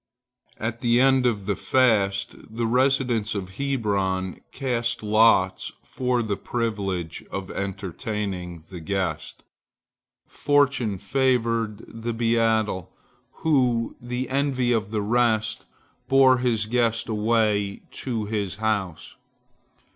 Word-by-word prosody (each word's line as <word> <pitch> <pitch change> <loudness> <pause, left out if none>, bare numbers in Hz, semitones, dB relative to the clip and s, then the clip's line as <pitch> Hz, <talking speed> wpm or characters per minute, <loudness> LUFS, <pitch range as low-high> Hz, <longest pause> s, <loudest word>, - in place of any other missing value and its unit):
At 115 +1 -3
the 120 0 +3
end 130 -1 +4
of 105 -5 -1
the 100 -1 0
fast, 100 -7 +2 0.2
the 115 +1 -2
residents 125 -3 +2
of 95 -1 -6
Hebron 100 -9 -1
cast 120 -4 -2
lots 105 -3 +3
for 125 -2 -1
the 105 -2 -1
privilege 100 -8 -3
of 95 -1 -5
entertaining 95 -2 -4
the 90 - -7
guest. 80 -2 -3 0.8
Fortune 140 -8 +1
favored 115 -1 0
the 115 +1 -5
beadle, 115 -5 +1 0.5
who, 125 -7 +2
the 125 +1 -3
envy 130 -2 +1
of 110 -4 0
the 105 -1 -1
rest, 110 -1 +1 0.4
bore 130 -1 +5
his 115 -4 +1
guest 115 0 +1
away 105 -2 +1
to 115 -5 -3
his 100 -3 -2
house. 105 -5 -2
110 Hz, 110 wpm, -24 LUFS, 100-125 Hz, 0.8 s, bore